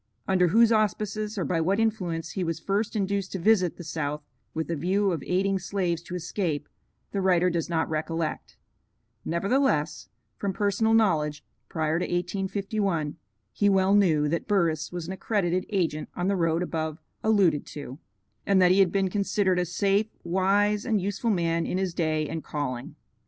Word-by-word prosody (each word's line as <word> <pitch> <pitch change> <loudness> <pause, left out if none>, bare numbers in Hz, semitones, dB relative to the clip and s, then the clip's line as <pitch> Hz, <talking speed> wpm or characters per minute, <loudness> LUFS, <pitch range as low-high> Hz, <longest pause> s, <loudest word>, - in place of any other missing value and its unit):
Under 185 -2 +3
whose 230 +6 +5
auspices 215 0 0
or 185 - -1
by 165 -3 0
what 190 +6 +1
influence 180 -8 -1
he 190 - -2
was 165 -2 -2
first 205 +5 -1
induced 200 -2 -1
to - - -1
visit 185 -2 +3
the 175 - -8
South 150 -2 -3 0.3
with 160 +1 -3
a - - 0
view 190 +6 +1
of 165 -5 -2
aiding 195 +1 +1
slaves 180 -3 -1
to 175 - -7
escape, 175 -3 -2 0.4
the 200 - -1
writer 180 -1 +3
does 170 -1 -2
not 165 -1 0
recollect; 160 0 -3 0.7
nevertheless, 170 - 0 0.3
from 200 -1 -2
personal 210 +3 +2
knowledge, 155 -9 +1 0.2
prior 160 -1 0
to - - -1
1851, 190 -2 -2 0.4
he 205 - +2
well 190 0 +3
knew 165 -8 +4
that 165 +3 -2
Burris 165 -6 +1
was 175 -2 -5
an 185 - -4
accredited 185 -2 -1
agent 170 -7 -1
on 180 - -1
the 200 - +2
road 165 -1 +1
above 160 -3 -3 0.3
alluded 195 -9 +3
to, 140 -1 -8 0.4
and 195 -1 +3
that 180 -1 +6
he 190 - +4
had 190 -3 +5
been 195 -2 +1
considered 195 -2 +1
a 180 - +1
safe, 200 +4 +1 0.2
wise, 200 +4 +2
and 220 -4 +1
useful 200 +5 -2
man 170 -4 +1
in - - -1
his 190 -2 -1
day 155 -2 0
and 160 +1 -5
calling. 130 -5 -4
180 Hz, 175 wpm, -26 LUFS, 165-200 Hz, 0.7 s, that